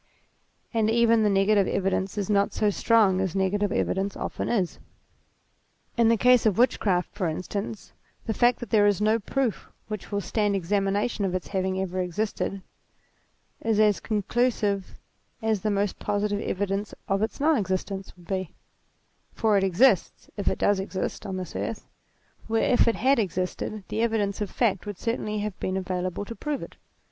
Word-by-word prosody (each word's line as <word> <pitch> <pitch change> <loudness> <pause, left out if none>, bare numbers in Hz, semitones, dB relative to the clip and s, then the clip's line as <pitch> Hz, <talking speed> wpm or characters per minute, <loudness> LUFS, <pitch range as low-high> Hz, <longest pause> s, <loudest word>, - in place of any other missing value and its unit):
And 220 -2 +2
even 230 0 +4
the 210 - +3
negative 195 0 +3
evidence 195 +1 -1
is 200 -2 -1
not 200 -1 +2
so 210 -1 +2
strong 205 -3 +3
as 190 -2 -2
negative 195 +1 +1
evidence 195 0 -1
often - - -3
is. 195 -7 0 1.2
In 235 -1 +4
the 230 - +4
case 250 0 +5
of 205 - +1
witchcraft, 195 -7 +2
for 185 - -1
instance, 200 +6 -5 0.3
the 220 - -1
fact 245 +3 +3
that 240 - -7
there 210 -2 +5
is 205 -2 +2
no 215 +2 +3
proof 250 +1 -2 0.2
which 215 -1 -6
will 200 - 0
stand 205 0 0
examination 200 +4 0
of 185 -2 0
its 185 - -4
having 190 -1 -1
ever 185 -1 -2
existed, 195 +1 -2 1.0
is 225 -2 +1
as 210 -2 +4
conclusive 210 -2 0 0.4
as 220 -4 0
the 215 - 0
most 200 -1 0
positive 205 0 -1
evidence 200 +1 -2
of 195 +1 +1
its 220 - -2
non 310 +2 +4
existence 195 -2 -2
would 175 - -17
be; 185 -2 -3 0.8
for 220 -2 +2
it 195 - +3
exists, 195 +2 +2
if 200 - -5
it - - +2
does 205 -1 +2
exist, 190 0 -4
on 190 -1 -3
this 185 -2 -6
earth, 225 - -4 0.6
where 225 +2 +2
if 245 - +4
it 230 - +3
had 265 +2 +3
existed 185 +2 -2
the 220 - -1
evidence 215 -3 0
of 205 - -2
fact 210 -3 0
would 205 -3 -5
certainly 215 -1 -2
have 210 -2 -4
been 185 0 -1
available 185 +1 -3
to 230 - -7
prove 300 +2 -3
it. - - -10
205 Hz, 175 wpm, -26 LUFS, 190-220 Hz, 1.2 s, case